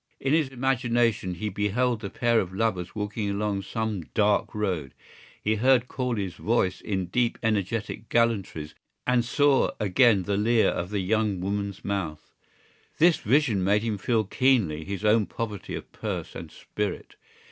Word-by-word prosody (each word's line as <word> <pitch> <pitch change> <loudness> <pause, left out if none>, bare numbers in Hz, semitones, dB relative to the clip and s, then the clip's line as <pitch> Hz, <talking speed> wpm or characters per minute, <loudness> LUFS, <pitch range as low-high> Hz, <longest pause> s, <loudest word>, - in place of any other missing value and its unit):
In 135 +1 0
his 155 -3 +3
imagination 120 -6 0
he 105 +5 -3
beheld 105 +4 0
the 100 - -4
pair 120 +1 +2
of 90 - -2
lovers 95 -5 -1
walking 105 0 -2
along 100 0 -1
some 110 0 -3
dark 105 -1 +2
road; 90 -10 -2 0.4
he 110 +1 0
heard 125 +1 +4
Corley's 115 -10 -2
voice 95 -1 0
in 95 -3 -2
deep 120 +6 0
energetic 110 +1 -2
gallantries 100 -10 0 0.3
and 125 -1 +3
saw 140 +2 +3
again 105 0 +4
the 100 +1 -1
leer 110 +2 +3
of 90 - -3
the 100 -1 -1
young 105 0 0
woman's 100 +1 -3
mouth. 85 -7 -3 0.7
This 170 +1 +5
vision 120 -5 +2
made 105 +3 +2
him 110 -3 -2
feel 110 +1 +1
keenly 105 - +1
his 100 +2 -4
own 105 -1 +4
poverty 105 -4 -5
of - - -8
purse - - -5
and 85 - -8
spirit. 105 -3 -5
105 Hz, 155 wpm, -26 LUFS, 100-120 Hz, 0.7 s, This